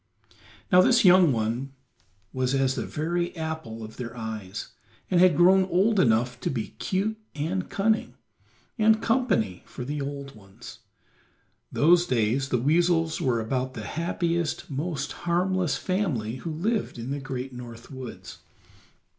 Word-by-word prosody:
Now 180 0 +8
this 235 +2 +4
young 180 -3 +7
one 120 +4 -2 0.6
was 130 0 0
as 135 -1 +2
the 130 - -4
very 170 +3 -2
apple 160 -9 -5
of 110 0 -10
their 120 -1 -6
eyes, 110 -4 -6 0.4
and 180 - +4
had 180 -5 +5
grown 185 +2 +6
old 195 +4 +2
enough 120 -2 +2
to - - -2
be 115 -5 -3
cute 210 +3 -1 0.2
and 170 +5 -2
cunning, 220 +2 0 0.6
and 220 0 +5
company 220 - +1
for 125 - -7
the 145 +2 -3
old 140 0 -5
ones; 110 +4 -13 0.9
those 175 +3 +4
days 125 +3 +1
the 125 - +2
weasels 165 +4 +2
were 125 -3 +1
about 130 +3 -2
the 110 -3 -6
happiest, 170 0 -2
most 145 0 -3
harmless 180 -2 0
family 145 - -1
who 165 - -6
lived 200 - -1
in 120 +3 -5
the 145 - -2
great 135 -1 -5
North 120 0 -10
woods. 130 -3 -9
145 Hz, 145 wpm, -26 LUFS, 125-180 Hz, 0.9 s, Now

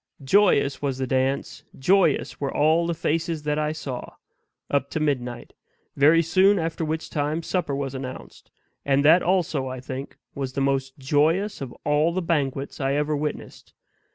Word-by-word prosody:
Joyous 140 -4 +3
was 135 -3 -1
the 130 - -1
dance 130 +1 -1
joyous 175 +1 +2
were 140 - -1
all 165 +3 +2
faces 165 0 -2
that 150 0 0
I 150 0 0
saw 135 -5 -6 0.6
up 140 -1 +1
to - - -3
midnight, 125 -5 -2 0.4
very 155 +4 +5
soon 190 +5 +4
after 165 -1 -2
which 160 +1 -3
time 155 +2 -2
supper 175 -7 -1
was 135 -1 -3
announced; 130 -1 -8 0.3
and 140 0 +2
that 165 +4 +7
also, 165 -7 0
I 130 0 -5
think, 130 +2 -7 0.2
was 135 -2 -4
the 140 - -2
most 135 -1 -1
joyous 155 +9 +1
of 135 -3 -5
all 150 +3 +2
the 185 - -1
banquets 140 -5 -2
I 135 0 +1
ever 150 +1 0
witnessed. 150 +1 -6
145 Hz, 160 wpm, -24 LUFS, 135-165 Hz, 0.6 s, that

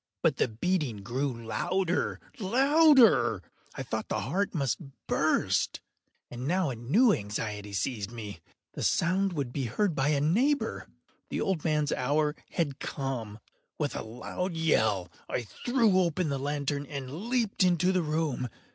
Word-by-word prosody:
But - - +3
the - - +2
beating 120 - -1
grew 130 +6 -1
louder, 180 +9 0 0.2
louder! 245 - +5 0.3
I - - -4
thought - - -3
the - - -1
heart 200 +1 -1
must 135 -6 0 0.3
burst. - - +1 0.5
And 125 +2 -5
now 180 -3 +1
a - - -4
new 195 - +4
anxiety 105 - -4
seized 105 0 -2
me—the 105 -8 -10
sound 190 +2 +2
would 140 -6 -3
be 135 -3 -1
heard 170 - 0
by 135 -1 +1
a 150 -1 +2
neighbour! 240 - +1 0.4
The - - -2
old 185 -6 0
man’s 150 -3 +1
hour 150 +4 +1
had 145 -6 -2
come! 125 -7 -4 0.4
With - - -2
a - - -3
loud 145 +11 -4
yell, 110 - +1 0.2
I 125 - -1
threw 225 - +2
open 170 -2 +1
the 140 -1 -1
lantern 145 0 -2
and 140 - -6
leaped 235 -6 +1
into 180 0 +3
the 185 -1 +2
room. 155 -5 -1
150 Hz, 145 wpm, -29 LUFS, 120-185 Hz, 0.5 s, louder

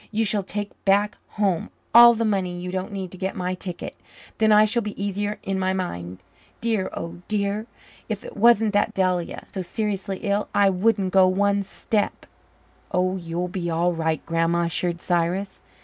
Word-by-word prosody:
You 220 +1 0
shall 205 0 +1
take 205 +2 -5
back 205 +1 +3 0.2
home 195 -5 +1 0.2
all 235 0 +9
the 230 0 0
money 185 -4 -1
you 180 0 -5
don't 185 +2 -3
need 190 -3 -5
to 185 - -11
get 190 0 -2
my 180 0 -2
ticket. 180 -1 -6 0.4
Then 220 -1 +4
I 210 0 +7
shall 235 +3 +1
be 210 -2 -6
easier 205 +1 -2
in 195 -1 -2
my 185 0 +1
mind. 90 - -4 0.4
Dear, 225 -5 0
oh 170 +1 -6
dear, 210 +1 -1 0.4
if 210 -2 -4
it - - -9
wasn't 225 -1 +4
that 205 - +1
Delia 180 -2 0
is - - -31
so 190 - -3
seriously 195 +1 -3
ill 205 0 0
I 200 -1 +5
wouldn't 195 0 +1
go 190 -1 +6
one 200 +2 +2
step." 205 +2 -2 0.7
"Oh, 185 +1 +1
you'll 175 0 -3
be 180 -1 -3
all 170 +2 +1
right, 160 -1 -1
Grandma," 165 +1 +1
assured 170 +1 -1
Cyrus. 175 +3 -1
190 Hz, 180 wpm, -24 LUFS, 180-205 Hz, 0.7 s, all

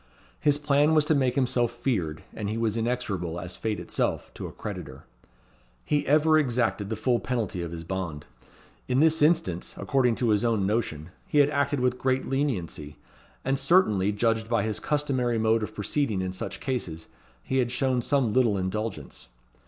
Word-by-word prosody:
His 145 -1 +3
plan 145 +1 +3
was 155 -1 +4
to 160 - +3
make 130 -4 +1
himself 120 -3 +2
feared; 105 - -2
and 105 -2 -4
he 110 - -2
was 115 -2 0
inexorable, 110 -8 -2
as 90 0 -6
fate 110 -2 -2
itself, - - -2
to - - -6
a - - -9
creditor. - - -7 0.8
He 145 -1 0
ever 155 +2 +5
exacted 120 -7 0
the 110 - -1
full 120 +2 +1
penalty 110 -7 -2
of 85 -1 -5
his 85 -1 -6
bond. 85 -4 -4 0.6
In 125 +1 +2
this 160 +1 +4
instance, 155 - +1
according 125 -4 +2
to 120 -1 0
his 105 +1 +3
own 115 -5 +1
notion, 90 -7 -2 0.2
he - - -1
had 145 0 +5
acted 140 -1 0
with 125 0 +1
great 130 0 0
leniency; 95 - -2 0.5
and 135 +1 +1
certainly, 135 - +3
judged 110 +1 0
by 115 - +2
his 110 -2 -2
customary 130 -5 0
mode 110 0 +2
of 110 0 -5
proceeding 105 0 0
in 95 0 -3
such 95 - -5
cases, 90 - -3 0.4
he 130 - 0
had 120 -1 +1
shown 130 0 +1
some 125 -4 +1
little 120 -6 +3
indulgence. 95 - -4
120 Hz, 175 wpm, -27 LUFS, 100-135 Hz, 0.8 s, ever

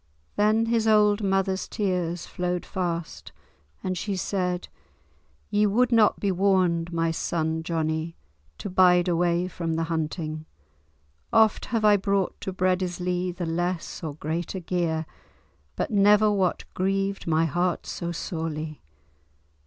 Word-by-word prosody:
Then 215 +2 +3
his 225 -1 +1
old 210 -1 +4
mother's 195 -1 0
tears 180 -5 -2
flowed 180 -1 -3
fast, 170 -3 -4 0.5
and 185 - -1
she 200 +3 -3
said, 180 -1 -2 0.8
"Ye 210 0 +3
would 245 +5 +2
not 225 -3 +4
be 200 - +1
warned, 180 -3 +2
my 165 -1 0
son 160 0 -1
Johnie, 160 0 -2 0.4
to - - -6
bide 180 -1 +4
away 175 0 +1
from 165 -2 -3
the 165 - 0
hunting. 155 -1 -3 0.8
Oft 220 -1 +4
have 225 -3 0
I 210 -1 +6
brought 195 -1 -1
to 190 - -3
Breadislee 180 -1 0
the 180 - -2
less 175 +2 -3
or 150 -3 -4
greater 165 +5 -3
gear, 165 -3 -1 0.7
but - - -2
never 210 +1 +5
what 190 -3 0
grieved 195 +1 -1
my 165 0 +3
heart 175 +3 -1
so 170 0 -4
sorely. 160 -3 -4
180 Hz, 130 wpm, -26 LUFS, 165-195 Hz, 0.8 s, I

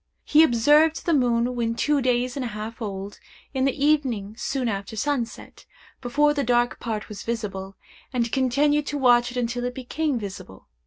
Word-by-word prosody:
He 300 - +5
observed 300 +4 +4
the 340 - +2
moon 245 -2 +2
when 230 -1 -1
two 295 +3 +1
days 250 0 0
and 275 - -3
a - - -2
half 220 +3 -7
old, 200 -1 -5 0.3
in 265 -1 +1
the 275 +1 0
evening 250 -10 +1
soon 260 +1 -2
after 200 0 -4
sunset, 255 -1 -4 0.3
before 295 +4 +2
the 285 -1 -1
dark 240 0 +1
part 220 -2 -4
was 205 -2 -8
visible, 195 -4 -4 0.4
and 235 -3 -1
continued 285 +3 +2
to 295 - -2
watch 245 -2 +4
it 250 - -7
until 245 0 -1
it 250 0 -3
became 275 +2 -2
visible. 195 - -8
245 Hz, 175 wpm, -24 LUFS, 230-280 Hz, 0.4 s, He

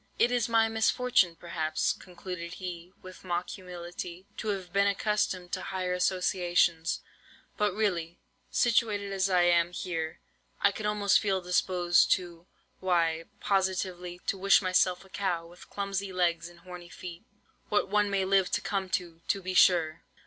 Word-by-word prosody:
"'It 240 - +3
is 240 -2 +1
my 225 -1 +4
misfortune, 225 -4 +2
perhaps,' 160 -2 -1
concluded 175 -1 -8
he, 180 -1 -7
with 185 0 -11
mock 175 -1 -2
humility, 175 0 -8
'to - - -6
have 195 -3 -3
been 200 0 +4
accustomed 200 -3 0
to 185 - -2
higher 185 -1 -2
associations; 180 -2 +1 0.5
but 210 -1 +1
really, 175 -6 -1 0.3
situated 210 -4 +1
as 195 0 +1
I 180 -2 +4
am 175 0 +3
here, 165 -3 -4 0.4
I 200 - +4
could 210 +1 -4
almost 205 -1 +3
feel 195 -3 0
disposed 180 -1 +2
to—why, 170 -1 -1 0.2
positively, 185 -2 -1
to 195 - -1
wish 195 +1 +6
myself 185 -1 +1
a - - -18
cow, 175 -4 -2
with 175 +1 -15
clumsy 200 -1 -3
legs 170 -2 0
and 170 0 -18
horny 180 -1 -10
feet. 175 -1 -9 0.5
What 205 - +2
one 210 0 +2
may 195 -1 +1
live 190 -1 +3
to - - +3
come 195 -2 -2
to, 170 -3 -12
to 200 - +1
be 185 0 -3
sure! 170 -3 +4
185 Hz, 155 wpm, -29 LUFS, 175-200 Hz, 0.5 s, wish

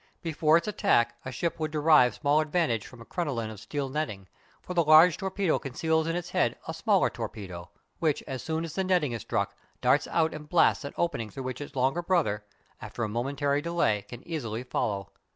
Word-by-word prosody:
Before 160 -1 +3
its 170 - -3
attack 195 - +2
a 130 - -4
ship 170 +7 -2
would 155 -1 -1
derive 150 -6 +4
small 145 +8 +2
advantage 150 - 0
from 125 -2 -14
a - - -11
crinoline 125 -11 -3
of 105 - -10
steel 140 +6 -3
netting; 130 -9 -4 0.4
for 180 - -5
the 170 -1 +3
large 155 +2 +7
torpedo 190 -3 0
conceals 160 +4 0
in 165 - -1
its 175 -1 -4
head - - +1
a - - -3
smaller - - +2
torpedo, 90 -4 -7 0.3
which, 155 -3 +1
as 130 -2 -5
soon 160 0 -2
as 160 - -7
the 190 - 0
netting 180 -7 +2
is 115 -2 -4
struck, - - -2 0.2
darts 130 +3 +3
out 160 -1 +1
and 150 -1 -9
blasts 170 -3 +3
an 140 - -6
opening 145 -11 -1
through 135 +6 -7
which 130 +1 -5
its 145 - -8
longer 135 +6 +1
brother, 165 - +1 0.4
after 120 - -5
a - - 0
momentary 140 +6 -1
delay, 170 -11 +1
can 120 0 -10
easily 120 -9 -3
follow. 100 -5 -2
145 Hz, 205 wpm, -28 LUFS, 120-165 Hz, 0.4 s, large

